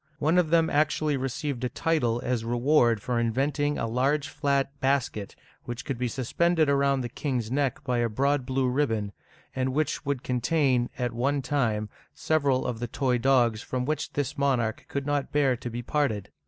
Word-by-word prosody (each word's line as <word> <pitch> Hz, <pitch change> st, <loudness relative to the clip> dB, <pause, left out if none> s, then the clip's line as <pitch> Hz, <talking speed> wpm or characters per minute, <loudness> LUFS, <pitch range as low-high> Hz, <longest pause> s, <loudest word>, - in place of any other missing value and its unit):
One 160 Hz, +4 st, +3 dB
of 170 Hz, -3 st, +1 dB
them 165 Hz, 0 st, +4 dB
actually 150 Hz, 0 st, +1 dB
received 135 Hz, 0 st, -3 dB
a 125 Hz, -, 0 dB
title 120 Hz, -5 st, 0 dB
as 120 Hz, -2 st, 0 dB
reward 120 Hz, -1 st, +2 dB
for 120 Hz, -2 st, 0 dB
inventing 140 Hz, +5 st, 0 dB
a -, -, -1 dB
large 135 Hz, +5 st, 0 dB
flat 140 Hz, -1 st, 0 dB
basket 130 Hz, -7 st, -1 dB, 0.3 s
which 120 Hz, 0 st, -6 dB
could 135 Hz, -5 st, -3 dB
be 125 Hz, -, 0 dB
suspended 155 Hz, +7 st, +1 dB
around 140 Hz, -1 st, +2 dB
the 120 Hz, -, -3 dB
king's 120 Hz, -2 st, -3 dB
neck 135 Hz, -2 st, 0 dB
by 125 Hz, -1 st, 0 dB
a 120 Hz, -1 st, +1 dB
broad 140 Hz, +5 st, +1 dB
blue 130 Hz, 0 st, 0 dB
ribbon, 115 Hz, -6 st, 0 dB, 0.4 s
and 130 Hz, 0 st, -1 dB
which 155 Hz, 0 st, 0 dB
would 140 Hz, -3 st, -2 dB
contain, 125 Hz, -1 st, +1 dB
at 125 Hz, -2 st, -2 dB
one 135 Hz, +4 st, 0 dB
time, 115 Hz, -7 st, 0 dB, 0.3 s
several 140 Hz, -5 st, +1 dB
of 120 Hz, -2 st, -3 dB
the 120 Hz, -, -3 dB
toy 130 Hz, 0 st, 0 dB
dogs 120 Hz, -3 st, +3 dB
from 125 Hz, -1 st, -3 dB
which 155 Hz, +2 st, -2 dB
this 140 Hz, -1 st, -2 dB
monarch 125 Hz, -6 st, 0 dB
could 140 Hz, -1 st, -3 dB
not 145 Hz, -1 st, -1 dB
bear 140 Hz, -3 st, +3 dB
to 120 Hz, -, -6 dB
be 120 Hz, +1 st, -5 dB
parted. 115 Hz, -8 st, -1 dB
130 Hz, 180 wpm, -27 LUFS, 120-145 Hz, 0.4 s, them